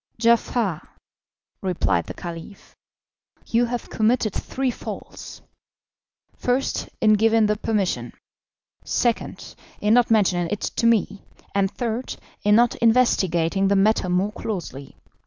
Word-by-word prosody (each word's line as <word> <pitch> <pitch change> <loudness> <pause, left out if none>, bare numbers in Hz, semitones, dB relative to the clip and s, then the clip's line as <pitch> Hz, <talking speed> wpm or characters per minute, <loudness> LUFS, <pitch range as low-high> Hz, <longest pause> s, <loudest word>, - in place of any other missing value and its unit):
"Giafar," 230 -6 +1 0.8
replied 175 - 0
the - - -7
Caliph, 175 +3 -9 0.7
"you 235 +1 +2
have 240 0 -4
committed 220 -1 +1
three 265 -1 -2
faults - - -9 0.9
first, 250 +2 -1
in 215 -1 +5
giving 220 +1 +3
the 210 0 +1
permission; 205 -3 -1 0.7
second, 240 -2 -2 0.3
in 210 +1 +2
not 245 0 +4
mentioning 185 -6 +2
it 210 - -3
to 230 - 0
me; 210 -3 +1 0.3
and 195 -1 +2
third, 240 +3 -4 0.3
in 210 0 +4
not 240 +1 +4
investigating 195 -6 +2
the 200 - +2
matter 195 -1 +2
more 185 +3 +1
closely. 175 -11 -6
215 Hz, 120 wpm, -23 LUFS, 190-230 Hz, 0.9 s, in